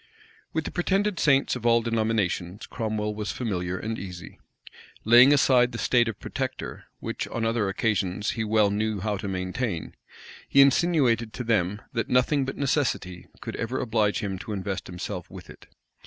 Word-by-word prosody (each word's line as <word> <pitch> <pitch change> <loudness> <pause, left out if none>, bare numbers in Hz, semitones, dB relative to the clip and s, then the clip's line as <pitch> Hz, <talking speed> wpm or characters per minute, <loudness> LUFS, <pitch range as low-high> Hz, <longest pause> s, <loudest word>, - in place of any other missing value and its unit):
With 160 - -1
the - - -4
pretended 195 +2 0
saints 135 -3 +3
of 125 - -7
all 115 -1 +4
denominations 110 -4 -1
Cromwell 110 -2 -3
was 105 0 -3
familiar 95 -6 -3
and 110 +3 -4
easy. 90 -3 -9 0.7
Laying 120 +5 +8
aside 125 -3 +4
the - - -4
state 120 0 +3
of 115 - -4
protector, - - -5
which - - -4
on 115 -1 -3
other 115 -3 +1
occasions 100 -1 0
he 110 - -2
well 105 -1 +3
knew 105 0 -1
how 105 +1 -1
to 100 - -5
maintain, 95 0 -3 0.6
he 140 - +4
insinuated 135 -5 +4
to 125 - -4
them, 105 -3 0
that 115 - -2
nothing 130 +2 +2
but 135 - -5
necessity 130 - -1
could - - -5
ever 120 +3 -2
oblige 110 -3 +1
him 95 -2 -3
to 105 +5 -6
invest 95 -1 -4
himself 90 0 -6
with 90 -2 -11
it. - - -16
110 Hz, 170 wpm, -26 LUFS, 100-125 Hz, 0.7 s, Laying